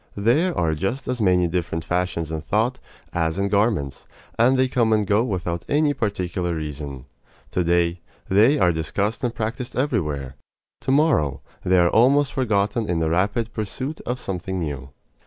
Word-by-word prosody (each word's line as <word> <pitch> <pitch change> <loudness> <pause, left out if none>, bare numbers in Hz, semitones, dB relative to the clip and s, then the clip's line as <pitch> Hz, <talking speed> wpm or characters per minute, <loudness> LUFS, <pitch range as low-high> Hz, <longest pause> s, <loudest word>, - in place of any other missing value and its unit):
There 145 - +2
are 80 -2 +1
just 95 - -3
as 125 -2 -2
many 90 -3 +3
different 85 -1 -2
fashions 90 -3 -1
in 80 -1 -3
thought 115 - 0 0.3
as 80 -1 0
in 100 0 0
garments, 100 - 0 0.3
and 125 +3 +4
they 130 0 +3
come 120 -3 +1
and 105 -1 +2
go 105 +3 +3
without 90 -6 -3
any 145 0 +3
particular 90 -6 -2
reason. 75 -4 -6 0.5
To 90 - +1
day, 85 0 +1 0.3
they 110 +10 +4
are 90 -9 +4
discussed 100 - -2
and 120 - +1
practised 120 +3 -4
everywhere. 75 - -1 0.4
To - - -2
morrow, 120 - +2 0.2
they 95 +1 +3
are 85 -1 +5
almost 135 +6 +4
forgotten 110 -3 0
in 90 - +1
the 80 -1 0
rapid 105 +6 0
pursuit 130 +8 -4
of 125 +1 -2
something 95 -3 -4
new. 70 -6 -4
100 Hz, 165 wpm, -23 LUFS, 85-120 Hz, 0.5 s, are